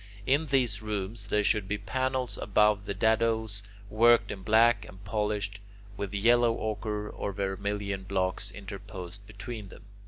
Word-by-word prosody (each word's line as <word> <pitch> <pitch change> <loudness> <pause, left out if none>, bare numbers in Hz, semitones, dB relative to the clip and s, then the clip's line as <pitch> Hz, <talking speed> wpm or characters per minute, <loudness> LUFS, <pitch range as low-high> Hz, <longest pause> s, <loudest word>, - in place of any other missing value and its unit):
In 145 +6 +2
these 125 -6 +2
rooms 105 0 -4
there 105 +1 +2
should 105 -1 +2
be 105 +1 -1
panels 130 +5 -1
above 105 -1 +3
the 100 - -2
dadoes, 110 0 +2 0.3
worked 120 +3 +4
in 95 - -6
black, 115 +4 +4
and 95 +1 -13
polished, 105 -1 -1 0.4
with 100 -1 -4
yellow 115 +3 +4
ochre 105 -1 -3
or 100 - -4
vermilion 100 0 -2
blocks 95 -1 -1
interposed 100 -2 -8
between 110 -1 -7
them. - - -13
105 Hz, 145 wpm, -29 LUFS, 100-110 Hz, 0.4 s, worked